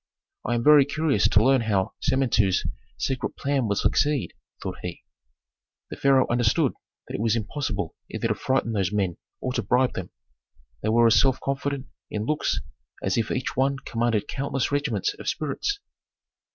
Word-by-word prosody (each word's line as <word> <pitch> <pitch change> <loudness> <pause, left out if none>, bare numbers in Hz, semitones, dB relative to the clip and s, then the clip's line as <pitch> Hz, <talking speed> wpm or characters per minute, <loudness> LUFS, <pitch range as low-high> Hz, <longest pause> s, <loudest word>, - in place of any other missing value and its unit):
"I 120 - +1
am 115 - 0
very 150 0 +8
curious 140 - +1
to 105 - +4
learn 135 0 +4
how 100 -4 0
Samentu's 120 -8 +2 0.3
secret 130 -2 -2
plan 140 -4 0
will 100 - +1
succeed," 145 +5 +1 0.3
thought - - -5
he. - - -6 0.9
The - - -4
pharaoh 135 -1 +4
understood 120 -2 +2 0.3
that - - -8
it - - -2
was 115 -1 +2
impossible 110 - -3
either - - -2
to - - +3
frighten 130 -3 0
those 100 -4 0
men 95 -5 0 0.2
or 130 - -2
to - - 0
bribe 125 +1 +2
them. 90 - -5 0.7
They - - 0
were 115 +1 +5
as 115 -1 +6
self 130 -1 +2
confident 140 0 -2 0.2
in 105 0 -3
looks 155 +4 0 0.4
as 95 - +1
if 115 -1 0
each 125 - -2
one 135 +2 +2
commanded 115 -4 -1
countless 135 0 -2
regiments 140 -9 0
of - - -2
spirits. 155 - -2
125 Hz, 165 wpm, -25 LUFS, 110-140 Hz, 0.9 s, very